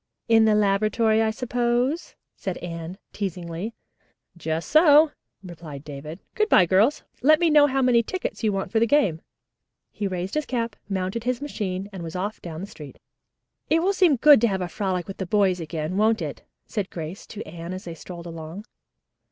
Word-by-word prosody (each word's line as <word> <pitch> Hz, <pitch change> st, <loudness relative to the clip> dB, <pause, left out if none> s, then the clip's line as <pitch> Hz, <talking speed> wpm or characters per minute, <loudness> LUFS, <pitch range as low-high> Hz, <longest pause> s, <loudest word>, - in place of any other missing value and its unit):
"In 225 Hz, -1 st, +5 dB
the 215 Hz, -1 st, +4 dB
laboratory, 215 Hz, +2 st, +2 dB
I 220 Hz, -, +2 dB
suppose," 245 Hz, +5 st, -1 dB, 0.2 s
said 190 Hz, -2 st, -4 dB
Anne 170 Hz, +1 st, -6 dB, 0.2 s
teasingly. 180 Hz, +1 st, -4 dB, 0.6 s
"Just 160 Hz, -1 st, -3 dB
so," 310 Hz, 0 st, +7 dB, 0.3 s
replied 160 Hz, -6 st, -9 dB
David. 150 Hz, +3 st, -8 dB
"Good 430 Hz, 0 st, +1 dB
bye, 180 Hz, -, +6 dB
girls. 200 Hz, -, +3 dB, 0.2 s
Let 305 Hz, +4 st, +5 dB
me 340 Hz, -2 st, +3 dB
know 295 Hz, -1 st, +7 dB
how 270 Hz, -1 st, +1 dB
many 245 Hz, -2 st, +5 dB
tickets 370 Hz, +2 st, -5 dB
you 215 Hz, -, +3 dB
want 195 Hz, -1 st, -3 dB
for 225 Hz, -, +2 dB
the 230 Hz, -, +3 dB
game." 215 Hz, -, +2 dB, 0.7 s
He 205 Hz, -, -3 dB
raised 185 Hz, 0 st, -4 dB
his 305 Hz, -1 st, -1 dB
cap, 230 Hz, -4 st, -2 dB
mounted 195 Hz, +4 st, -2 dB
his 250 Hz, -1 st, 0 dB
machine 200 Hz, -9 st, -4 dB
and 190 Hz, -, -6 dB
was 165 Hz, 0 st, -7 dB
off 200 Hz, +4 st, -3 dB
down 165 Hz, -1 st, -7 dB
the -, -, -4 dB
street. 150 Hz, -8 st, -11 dB, 0.7 s
"It 325 Hz, +1 st, +3 dB
will 390 Hz, +2 st, +2 dB
seem 360 Hz, -7 st, +4 dB
good 285 Hz, 0 st, +7 dB
to 235 Hz, -, +4 dB
have 195 Hz, -3 st, -1 dB
a 180 Hz, -, -2 dB
frolic 185 Hz, -2 st, -2 dB
with 195 Hz, -, -7 dB
the 190 Hz, -, -4 dB
boys 190 Hz, -2 st, +2 dB
again, 160 Hz, +2 st, -4 dB
won't 220 Hz, +2 st, +2 dB
it?" -, -, -6 dB, 0.2 s
said 205 Hz, -4 st, -3 dB
Grace 165 Hz, +3 st, -7 dB
to 215 Hz, -, -8 dB
Anne 165 Hz, +2 st, -7 dB
as 185 Hz, 0 st, -6 dB
they 170 Hz, -, -7 dB
strolled 170 Hz, +1 st, -9 dB
along. 165 Hz, +4 st, -8 dB
200 Hz, 190 wpm, -24 LUFS, 175-240 Hz, 0.7 s, so